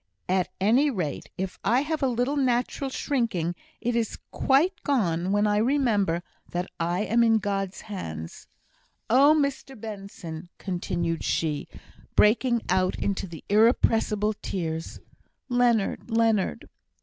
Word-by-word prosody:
At 185 -1 +1
any 240 +10 +4
rate, 175 - -3
if 190 0 -4
I 240 +5 +3
have 310 +1 -2
a 270 - +3
little 250 +3 0
natural 260 0 0
shrinking, 230 - -1 0.3
it 240 0 0
is 230 -2 -1
quite 335 +7 +2
gone 185 - 0
when 205 +1 +3
I 210 0 +2
remember 215 - +2 0.3
that 175 +1 -2
I 175 +3 0
am 235 +2 +3
in 225 -1 +5
God's 195 -2 -2
hands! 80 - -7 0.6
Oh, 280 +5 +6
Mr 275 -3 -2
Benson," 195 -6 -8
continued 175 -3 -2
she, 150 -3 -1 0.5
breaking 235 +2 +4
out 185 0 +2
into 195 -1 -2
the 165 -3 -10
irrepressible 215 -1 +3
tears 165 -3 -4 0.5
"Leonard, 240 -3 +1
Leonard!" 225 - +1
210 Hz, 125 wpm, -26 LUFS, 180-245 Hz, 0.6 s, Oh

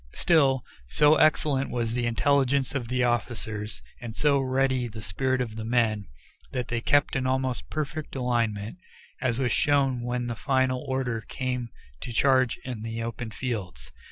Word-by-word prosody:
Still, 135 -6 +3 0.2
so 150 - +5
excellent 145 -3 +3
was 115 -2 -1
the 120 -1 0
intelligence 135 +4 +2
of 130 -5 -2
the 125 +1 0
officers, 110 -3 -2 0.2
and 115 -2 -6
so 145 0 +3
ready 130 -1 +1
the 110 -1 -9
spirit 130 +6 0
of 115 -3 -4
the 110 - -4
men, 110 -4 +1 0.5
that 125 -2 -2
they 120 -1 -1
kept 145 +3 +2
an 130 -1 0
almost 130 -1 -1
perfect 155 0 -4
alignment, 115 - -1 0.4
as 125 -4 +1
was 130 -2 +1
shown 135 -4 +2
when 120 0 -2
the 120 - -2
final 130 0 +1
order 130 -4 -1
came 125 -2 -3 0.3
to - - -5
charge 130 +1 +3
in 125 -4 -5
the 115 +1 -4
open 115 0 -4
fields. 100 - -5
125 Hz, 160 wpm, -27 LUFS, 115-135 Hz, 0.5 s, so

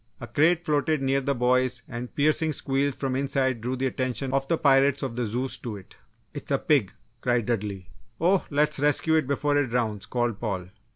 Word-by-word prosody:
A - - -6
crate 160 +8 +2
floated 155 0 +1
near 135 +1 +1
the 140 +1 -1
boys 125 0 +1
and 120 0 -7
piercing 155 +2 +2
squeals 135 0 0
from 135 -2 -2
the 130 - 0
inside 130 -3 0
drew 125 +3 -2
the 130 +1 -2
attention 130 0 -2
of 135 0 0
the 165 - +1
pirates 140 0 +3
of 130 -4 -3
the 120 -2 -1
Zeus 125 +5 -2
to 110 -4 -6
it. 95 - -15 0.4
"It's 145 - -7
a 140 - +2
pig!" 135 -10 +2 0.3
cried 120 -3 +1
Dudley. 100 -6 -3 0.3
"Oh, 180 +3 +2
let's 150 0 +1
rescue 150 +2 +3
it 155 -4 +2
before 145 +1 +1
it 145 -2 +2
drowns," 115 -4 -2
called 120 -4 -1
Paul. 95 -6 -3
130 Hz, 205 wpm, -26 LUFS, 120-145 Hz, 0.4 s, pirates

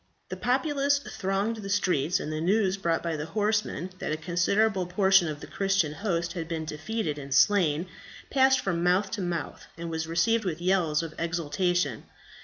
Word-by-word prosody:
The - - -4
populace 280 +2 +1
thronged 200 -4 -2
the 200 -2 -7
streets; 180 -3 +1
and 155 - -4
the 155 - -3
news 190 +2 +2
brought 170 -4 -1
by 165 -2 -1
the 150 +1 -4
horsemen 210 -1 -1
that - - -3
a 155 - -1
considerable 180 +4 +1
portion 190 -1 +4
of 150 -1 -5
the - - -7
Christian 195 -6 0
host 170 -3 -2
had 165 -3 -4
been 165 -1 -3
defeated 155 +1 -3
and 140 -1 -9
slain, 160 +2 +3 0.5
passed 265 -1 +4
from 175 -7 -1
mouth 185 +3 +2
to 215 - -3
mouth, 175 -3 -4
and 170 0 -5
was 160 0 -3
received 220 +8 +2
with 170 -4 -3
yells 175 -4 +1
of 160 -2 -6
exultation. 170 - -1
180 Hz, 180 wpm, -27 LUFS, 160-205 Hz, 0.5 s, portion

